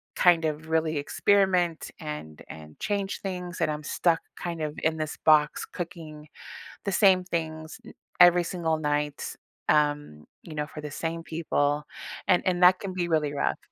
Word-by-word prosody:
kind 170 Hz, -2 st, +4 dB
of, 155 Hz, +1 st, -3 dB
really 160 Hz, -1 st, +1 dB
experiment 180 Hz, +2 st, +1 dB
and 150 Hz, -, -7 dB
and 75 Hz, -1 st, -11 dB
change 200 Hz, -1 st, -2 dB
things, 180 Hz, -2 st, -5 dB
and -, -, +2 dB
I'm 150 Hz, 0 st, -5 dB
stuck, 165 Hz, +2 st, +1 dB, 0.2 s
kind 170 Hz, -2 st, -4 dB
of 150 Hz, -1 st, -3 dB
in 160 Hz, 0 st, +2 dB
this 155 Hz, -2 st, -4 dB
box 155 Hz, -1 st, +4 dB
cooking 160 Hz, -4 st, -8 dB, 0.6 s
the 200 Hz, -, 0 dB
same 190 Hz, -2 st, +5 dB
things 160 Hz, -3 st, -4 dB
n -, -, -11 dB, 0.3 s
every 175 Hz, 0 st, +7 dB
single 165 Hz, -2 st, -1 dB
night, 150 Hz, -1 st, -2 dB, 0.3 s
um, 145 Hz, -, +1 dB, 0.2 s
you 165 Hz, -, -10 dB
know, 150 Hz, 0 st, -2 dB
for 150 Hz, -, -9 dB
the 150 Hz, -1 st, -7 dB
same 165 Hz, +3 st, -4 dB
people, 150 Hz, -3 st, 0 dB, 0.4 s
and 180 Hz, -, +4 dB
and 180 Hz, -1 st, +1 dB
that 185 Hz, +1 st, +7 dB
can 195 Hz, -2 st, -5 dB
be 180 Hz, -2 st, -1 dB
really 155 Hz, -3 st, +1 dB
rough. 140 Hz, -, 0 dB
160 Hz, 165 wpm, -27 LUFS, 150-175 Hz, 0.6 s, every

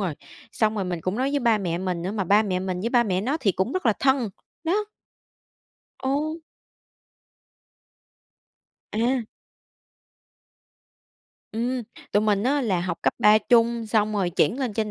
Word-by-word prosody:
rồi. 180 Hz, -7 st, -1 dB, 0.4 s
Xong 220 Hz, -1 st, +1 dB
rồi 200 Hz, -3 st, -1 dB
mình 175 Hz, -2 st, -3 dB
cũng 185 Hz, +5 st, -2 dB
nói 265 Hz, +2 st, 0 dB
với 285 Hz, -1 st, 0 dB
ba 230 Hz, -3 st, +3 dB
mẹ 175 Hz, -4 st, -2 dB
mình 180 Hz, -2 st, -2 dB
nữa, 185 Hz, -, -2 dB
mà 205 Hz, -3 st, -1 dB
ba 205 Hz, +4 st, +4 dB
mẹ 190 Hz, -4 st, -1 dB
mình 185 Hz, -1 st, -3 dB
với 230 Hz, +4 st, -2 dB
ba 240 Hz, -2 st, +4 dB
mẹ 190 Hz, -4 st, 0 dB
nó 270 Hz, +8 st, 0 dB
thì 195 Hz, -6 st, +2 dB
cũng 190 Hz, +9 st, -1 dB
rất 370 Hz, -9 st, -1 dB
là 225 Hz, -, +5 dB
thân, 260 Hz, -2 st, +1 dB, 0.3 s
đó. 405 Hz, +6 st, +1 dB, 1.2 s
Ồ. 295 Hz, +4 st, -1 dB, 2.6 s
À. 240 Hz, +3 st, +1 dB, 2.3 s
Ừm, 245 Hz, +2 st, -1 dB, 0.3 s
tụi 205 Hz, -, +4 dB
mình 205 Hz, -2 st, +2 dB
á 280 Hz, +5 st, +2 dB
là 190 Hz, -7 st, 0 dB
học 175 Hz, -1 st, -3 dB
cấp -, -, +2 dB
3 210 Hz, +1 st, +6 dB
chung 235 Hz, 0 st, +2 dB
xong 215 Hz, -1 st, +1 dB
rồi 195 Hz, -4 st, 0 dB
chuyển 205 Hz, +7 st, +1 dB
lên 250 Hz, -5 st, -1 dB
trên 215 Hz, -1 st, -1 dB
215 Hz, 165 wpm, -24 LUFS, 190-250 Hz, 2.6 s, 3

